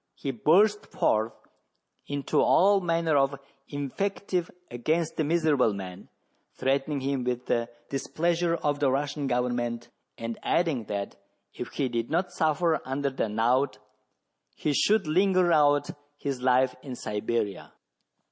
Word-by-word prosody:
He 140 - -3
burst 200 - +3
forth 110 +1 +1 0.8
into 145 -1 0
all 200 +1 +5
manner 165 -3 +1
of 135 0 +1 0.3
invective 180 +5 -2 0.2
against 155 +7 -1
the 160 - 0
miserable 150 -7 +2
man, 95 -1 -8 0.5
threatening 135 +1 0
him 135 -1 -1
with 125 0 -2
the 115 0 0 0.2
displeasure 170 +5 0
of 145 -3 -1
the 140 -2 +3
Russian 140 +1 -1
government, 120 -1 -1 0.3
and 115 0 -5
adding, 160 -10 0
that 100 -1 -4 0.4
if - - -6
he 135 - 0
did 120 -1 -2
not 180 +3 0
suffer 160 0 +1
under 135 +1 -2
the 130 -4 -2
knout 115 +3 +1 0.8
he 150 - -1
should 210 +7 +3
linger 185 +2 +3
out 145 -2 +3 0.3
his 135 -3 -4
life 130 0 +3
in 130 -2 -7
Siberia. 105 -2 -3
140 Hz, 130 wpm, -27 LUFS, 125-165 Hz, 0.8 s, all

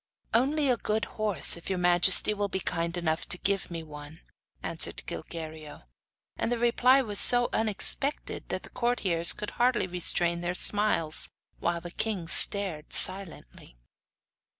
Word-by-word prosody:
'Only 280 +5 +1
a 250 -2 +1
good 215 0 -3
horse, 215 -3 +3
if 170 - -10
your 190 - -2
majesty 180 +3 +5
will 205 -1 -3
be 190 - -4
kind 170 -1 -3
enough 160 -2 -3
to - - +2
give 200 +1 -2
me 165 -2 -7
one,' 150 +1 -11 0.4
answered - - +1
Gilguerillo. 155 - -9 0.5
And - - -3
the 240 - -1
reply 250 +3 +2
was 205 -4 -3
so 245 0 +4
unexpected 225 +6 -1
that - - -5
the - - -13
courtiers 200 -9 +2
could 210 - -2
hardly 245 -3 0
restrain 175 -1 0
their 175 +1 -4
smiles, 190 -7 0 0.3
while 170 0 -3
the 175 0 -10
king 195 -4 -4
stared 170 -2 +1
silently. 175 - -3
185 Hz, 150 wpm, -27 LUFS, 170-220 Hz, 0.5 s, majesty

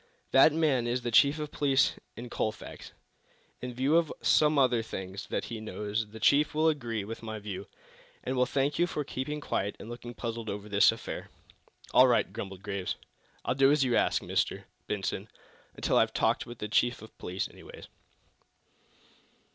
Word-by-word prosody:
"That 135 +4 +7
man 145 -6 +1
is 120 +1 -1
the 120 - -2
chief 140 +6 +5
of 150 -1 -5
police 140 -2 +2 0.2
in 120 +2 -7
Colfax. 110 -1 -4 0.7
In 125 - -4
view 135 +6 +2
of 170 -3 +1
some 150 -1 +4
other 125 -4 +4
things 95 -2 -6
that - - -2
he 115 - -6
knows 105 +1 -3
the 110 +1 -10
chief 145 +7 +3
will 155 +1 +3
agree 120 -8 -2
with 115 +3 -7
my 110 -1 -5
view, 105 -3 -6 0.6
and 130 - -2
will 125 0 +3
thank 140 +2 0
you 175 - +4
for 150 -3 -3
keeping 145 +2 -4
quiet 100 -8 -2
and 110 - -10
looking 120 0 -8
puzzled 115 -2 -4
over 100 +1 -5
this 100 -1 +5
affair." - - -6 0.6
"All - - +8
right," - - +2
grumbled 95 -1 -6
Mr. - - -16
Graves. 100 -2 -2 0.5
"I'll - - +1
do 135 +1 +5
as 150 -2 +3
you 125 -2 +2
ask, - - +2
Mr. - - -1 0.2
Benson 100 -2 -3 0.5
until - - +1
I've - - +3
talked - - +1
with 120 0 -9
the 105 - -4
chief 120 +2 +1
of 110 - -13
police, 90 +1 -3
anyway." - - -13
120 Hz, 180 wpm, -29 LUFS, 105-140 Hz, 0.7 s, All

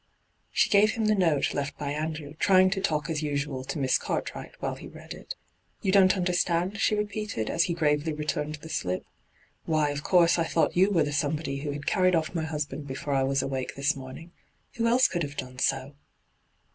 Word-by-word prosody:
She - - +2
gave 210 +2 +5
him 225 -2 -1
the 215 - +4
note 165 -8 +2
left 145 0 -3
by 145 -1 -3
Andrew, 155 -1 -4
trying 185 -1 +5
to 195 -1 -1
talk 155 -6 0
as 160 -2 -2
usual 140 -3 -2
to 155 - -4
Miss 135 -2 +2
Cartwright - - -4
while - - -2
he - - -9
read - - -10
it. - - -8 0.2
' 90 0 -43
You 190 - +2
don't 190 0 +5
understand 180 0 +1
V 215 - -9
she 215 - +2
repeated, 210 - -3
as 170 - +2
he 170 - -2
gravely 150 -1 +1
returned 150 0 -2
the 155 +2 -11
slip. 90 - -2 0.3
' - - -36
Why, 155 -2 +2
of 145 0 -4
course 170 0 +4
I 165 - +2
thought 160 0 +1
you 190 +3 +5
were 170 -6 +3
the 145 0 -3
somebody 145 -1 -1
who 145 +1 -4
had 145 0 -5
carried 185 -2 +3
off 160 0 -1
my 165 -2 -1
husband 150 -2 -4
before 140 +1 -4
I 135 - +2
was 135 0 +1
awake 130 -1 -3
this 140 +3 +1
morning 135 +6 -9 0.5
Who 230 0 +1
else 245 +2 +5
could 175 - -3
have 145 -2 -4
done 125 0 -6
so?' 135 +2 0
155 Hz, 220 wpm, -27 LUFS, 140-180 Hz, 0.5 s, gave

